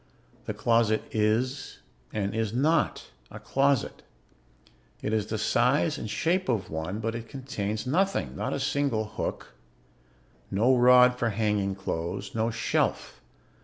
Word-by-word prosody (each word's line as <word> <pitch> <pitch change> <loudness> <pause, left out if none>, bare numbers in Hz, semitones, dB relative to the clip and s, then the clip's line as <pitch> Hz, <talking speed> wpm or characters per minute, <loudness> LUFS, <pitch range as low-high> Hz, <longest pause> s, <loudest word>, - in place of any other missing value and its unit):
The - - -3
closet 115 -2 +2
is 115 +5 0 0.3
and 100 -2 -2
is 110 -2 -1
not 150 +6 +1 0.2
a - - -9
closet; 140 -1 0 1.0
it 105 - -1
is 110 -2 0
the 110 - -2
size 130 +8 +2
and 110 - -5
shape 175 - 0
of 110 -5 -1
one, 80 +5 -3
but 115 +1 -2
it 115 0 -7
contains 120 -6 -4
nothing, 190 +9 0
not - - -3
a - - -2
single 140 -5 0
hook, 105 - -5 1.0
no 120 +7 +3
rod 125 0 +6
for 120 - +1
hanging 105 -2 0
clothes, 85 -3 -4
no 115 0 0
shelf. 110 -1 -1
115 Hz, 135 wpm, -27 LUFS, 105-135 Hz, 1.0 s, rod